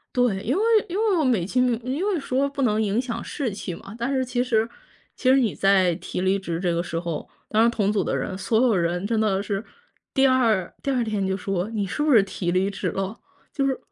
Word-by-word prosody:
对， 245 Hz, -6 st, +2 dB
因 245 Hz, +6 st, 0 dB
为 415 Hz, -, +1 dB, 0.3 s
因 365 Hz, -, -4 dB
为 430 Hz, -4 st, +2 dB
我 310 Hz, -, +2 dB
美 230 Hz, -9 st, +2 dB
其 250 Hz, +7 st, 0 dB
名 245 Hz, -2 st, +2 dB
因 275 Hz, +8 st, -2 dB
为 395 Hz, -4 st, +1 dB
说 275 Hz, 0 st, 0 dB
不 280 Hz, 0 st, -4 dB
能 215 Hz, -3 st, +2 dB
影 210 Hz, +2 st, +1 dB
响 250 Hz, -3 st, -4 dB
士 270 Hz, -5 st, -3 dB
气 190 Hz, -3 st, -5 dB
嘛， 200 Hz, +5 st, -11 dB
但 240 Hz, +4 st, -1 dB
是 260 Hz, -1 st, +1 dB
其 250 Hz, 0 st, -1 dB
实 225 Hz, -3 st, +1 dB, 0.5 s
其 255 Hz, -, +2 dB
实 265 Hz, -, +6 dB
你 235 Hz, -6 st, +1 dB
在 190 Hz, -3 st, +3 dB
提 -, -, -5 dB
离 190 Hz, +1 st, +2 dB
职 170 Hz, -4 st, -4 dB
这 175 Hz, -2 st, +1 dB
个 170 Hz, +1 st, 0 dB
时 165 Hz, -1 st, -4 dB
候， 170 Hz, -2 st, -4 dB, 0.2 s
当 220 Hz, +1 st, +4 dB
然 235 Hz, -, +5 dB
同 210 Hz, -3 st, 0 dB
组 210 Hz, -, +1 dB
的 -, -, -1 dB
人， 185 Hz, -, -3 dB
所 220 Hz, +3 st, +1 dB
有 225 Hz, -5 st, +3 dB
人 175 Hz, +2 st, 0 dB
真 225 Hz, -1 st, 0 dB
的 200 Hz, -3 st, +1 dB
是 200 Hz, +1 st, -3 dB, 0.5 s
第 270 Hz, 0 st, +5 dB
2 230 Hz, -8 st, +2 dB
第 275 Hz, -, -1 dB
2 250 Hz, -3 st, +1 dB
天 210 Hz, -3 st, -1 dB
就 190 Hz, 0 st, 0 dB
说， 195 Hz, 0 st, -2 dB
你 205 Hz, -3 st, -2 dB
是 190 Hz, -, -3 dB
不 300 Hz, -2 st, +3 dB
是 220 Hz, -4 st, +7 dB
提 190 Hz, -2 st, -3 dB
离 185 Hz, +3 st, +1 dB
职 -, -, -3 dB
了？ 195 Hz, +3 st, -3 dB, 0.3 s
就 275 Hz, -2 st, 0 dB
是 265 Hz, -1 st, 0 dB
220 Hz, 265 characters per minute, -24 LUFS, 190-255 Hz, 0.5 s, 是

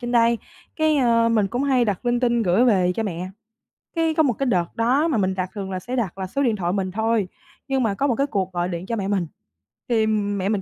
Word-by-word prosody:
trên 240 Hz, 0 st, -4 dB
đây, 235 Hz, 0 st, +4 dB, 0.4 s
cái, 315 Hz, -1 st, +2 dB
ơ, 230 Hz, -3 st, +3 dB
mình 215 Hz, -3 st, +2 dB
cũng 245 Hz, +7 st, -2 dB
hay 260 Hz, -3 st, +3 dB
đặt 205 Hz, +1 st, -2 dB
linh 240 Hz, 0 st, +1 dB
tinh 240 Hz, -2 st, +2 dB
gửi 195 Hz, +5 st, +3 dB
về 185 Hz, -6 st, +3 dB
cho 225 Hz, -, -1 dB
mẹ. 185 Hz, -2 st, -4 dB, 0.7 s
Cái 325 Hz, -1 st, +1 dB
có 315 Hz, 0 st, +3 dB
một 265 Hz, -5 st, +2 dB
cái 275 Hz, -, -2 dB
đợt 180 Hz, -9 st, 0 dB
đó 255 Hz, +7 st, +2 dB
mà 300 Hz, -8 st, 0 dB
mình 190 Hz, -2 st, +1 dB
đặt 185 Hz, -1 st, -2 dB
thường 195 Hz, -2 st, -5 dB
là 185 Hz, -, -3 dB
sẽ 245 Hz, +7 st, -5 dB
đặt 215 Hz, -8 st, -2 dB
là 190 Hz, -1 st, -4 dB
số 275 Hz, +9 st, -1 dB
điện 230 Hz, -5 st, +2 dB
thoại 175 Hz, -2 st, -1 dB
mình 190 Hz, -2 st, -1 dB
thôi, 220 Hz, 0 st, 0 dB, 0.4 s
nhưng 270 Hz, -2 st, +1 dB
mà 220 Hz, -3 st, +1 dB
có 275 Hz, +8 st, 0 dB
một 245 Hz, -, +1 dB
cái 275 Hz, +4 st, 0 dB
cuộc 190 Hz, -7 st, -2 dB
gọi 175 Hz, 0 st, -1 dB
điện 175 Hz, 0 st, -5 dB
cho 230 Hz, -, -2 dB
mẹ 200 Hz, -3 st, -2 dB
mình, 195 Hz, -4 st, 0 dB, 0.6 s
thì 220 Hz, -2 st, +2 dB
mẹ 205 Hz, -2 st, 0 dB
mình 210 Hz, -2 st, 0 dB
220 Hz, 265 wpm, -23 LUFS, 190-245 Hz, 0.7 s, đây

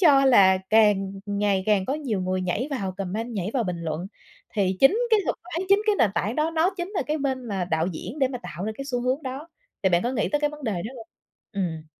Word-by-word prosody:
cho 280 Hz, -6 st, +6 dB
là 190 Hz, -7 st, +6 dB
càng 205 Hz, -3 st, +4 dB
ngày 200 Hz, -1 st, +1 dB
càng 205 Hz, -3 st, +3 dB
có 275 Hz, -, 0 dB
nhiều 250 Hz, -11 st, -2 dB
người 185 Hz, 0 st, -1 dB
nhảy 185 Hz, +9 st, -1 dB
vào 195 Hz, -9 st, -2 dB
comment, 210 Hz, +5 st, -3 dB
nhảy 195 Hz, 0 st, -2 dB
vào 240 Hz, -4 st, +1 dB
bình 175 Hz, -2 st, -3 dB
luận. 160 Hz, +2 st, -3 dB, 0.5 s
Thì 190 Hz, -2 st, +1 dB
chính 335 Hz, +12 st, +6 dB
cái 435 Hz, -2 st, +5 dB
thuật -, -, -1 dB
toán, 360 Hz, +1 st, -4 dB
chính 395 Hz, +1 st, +5 dB
cái 425 Hz, -2 st, +3 dB
nền 205 Hz, -, +4 dB
tảng 215 Hz, +3 st, -1 dB
đó 310 Hz, +1 st, +1 dB
nó 330 Hz, +3 st, +2 dB
chính 350 Hz, +2 st, -4 dB
là 405 Hz, -, -1 dB
cái 305 Hz, +1 st, -1 dB
bên 265 Hz, -3 st, -2 dB
mà 195 Hz, -3 st, -1 dB
đạo 160 Hz, +1 st, +1 dB
diễn 185 Hz, -, -6 dB
để 265 Hz, -2 st, +3 dB
mà 250 Hz, -2 st, -5 dB
tạo 175 Hz, +5 st, -6 dB
ra 220 Hz, -, -2 dB
cái 275 Hz, -, -5 dB
xu 250 Hz, -3 st, -2 dB
hướng 260 Hz, +4 st, 0 dB
đó. 270 Hz, +5 st, -6 dB, 0.3 s
Thì 190 Hz, -, +4 dB
bạn 175 Hz, -1 st, +3 dB
có 240 Hz, -, 0 dB
nghĩ 220 Hz, -, 0 dB
tới 295 Hz, 0 st, 0 dB
cái 295 Hz, -, +1 dB
vấn 300 Hz, -1 st, -10 dB
đề 220 Hz, -, 0 dB
đó 215 Hz, +9 st, -4 dB
hông? 225 Hz, -2 st, -10 dB, 0.5 s
Ừm. 165 Hz, -5 st, -3 dB
225 Hz, 260 wpm, -25 LUFS, 190-285 Hz, 0.5 s, cho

